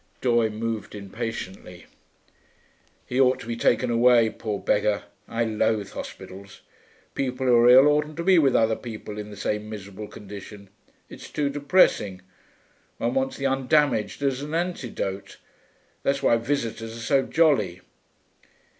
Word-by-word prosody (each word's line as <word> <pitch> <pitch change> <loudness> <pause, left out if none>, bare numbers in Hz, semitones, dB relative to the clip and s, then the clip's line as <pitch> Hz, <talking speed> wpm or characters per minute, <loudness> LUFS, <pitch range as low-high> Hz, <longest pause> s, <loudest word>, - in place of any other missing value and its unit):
Doye 120 -3 +2
moved 110 0 -4
impatiently. 95 -3 -7 1.2
'He 130 +2 0
ought 130 0 +3
to - - -9
be 115 0 -3
taken 120 +1 +1
away, 120 -1 +4
poor 105 -3 -4
beggar.... 105 0 +1 0.2
I 115 0 -1
loathe 110 -2 0
hospitals. 95 +1 -9 0.5
People 130 -1 -2
who 125 - +4
are 120 +1 +6
ill 130 +3 +8
oughtn't 150 +1 +1
to 170 - -3
be 185 -1 +5
with 135 -5 +3
other 110 0 +3
people 110 -3 -8
in 105 0 -7
the 105 - -10
same 105 0 -3
miserable 105 0 -8
condition; 100 0 -11 0.4
it's - - -11
too 145 -2 -1
depressing. 140 - +2 0.7
One 120 +1 -1
wants 135 0 -1
the 135 - -4
undamaged, 135 -3 +1
as 135 -1 0
an 150 +2 -4
antidote. 130 - -4 0.6
That's 140 0 -1
why 115 - +4
visitors 115 -3 -3
are - - -9
so 135 +4 +2
jolly.' 130 - +1
115 Hz, 145 wpm, -25 LUFS, 105-135 Hz, 1.2 s, ill